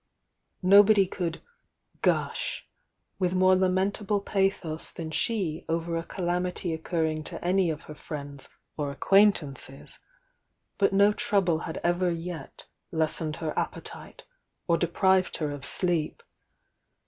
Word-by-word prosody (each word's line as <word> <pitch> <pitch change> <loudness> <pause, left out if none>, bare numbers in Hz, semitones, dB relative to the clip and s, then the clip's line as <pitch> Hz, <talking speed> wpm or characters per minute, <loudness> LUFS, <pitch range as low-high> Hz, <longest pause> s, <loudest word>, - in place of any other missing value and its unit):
Nobody 200 +1 +7
could 175 -3 -4 0.6
"gush" - - 0 0.5
with 180 -1 +1
more 185 0 +5
lamentable 195 +3 +1
pa'.ios 195 -5 -1
than 160 -2 -6
she 180 -5 -1
over 165 +1 -1
a 165 - 0
calamity 180 0 -2
occur 160 +1 -2
ring 155 -1 -1
to - - -5
any 185 0 +2
of 155 -2 -5
aer 150 - -7
friends 145 -2 -8 0.3
or 145 -2 -2
acquaintances, 145 -4 +1 0.8
but 195 - +4
no 200 +2 +5
trouble 185 -6 +1
had 160 - -4
ever 175 +1 +2
yet 170 0 -6 0.3
lessened 160 -1 -1
her 160 -2 -3
appetite, - - -5 0.4
or 170 - +4
de 175 - 0
prived 190 +2 +2
her 150 -2 -2
of 145 -1 -7
sleep. 175 -4 +1
175 Hz, 125 wpm, -27 LUFS, 160-190 Hz, 0.8 s, Nobody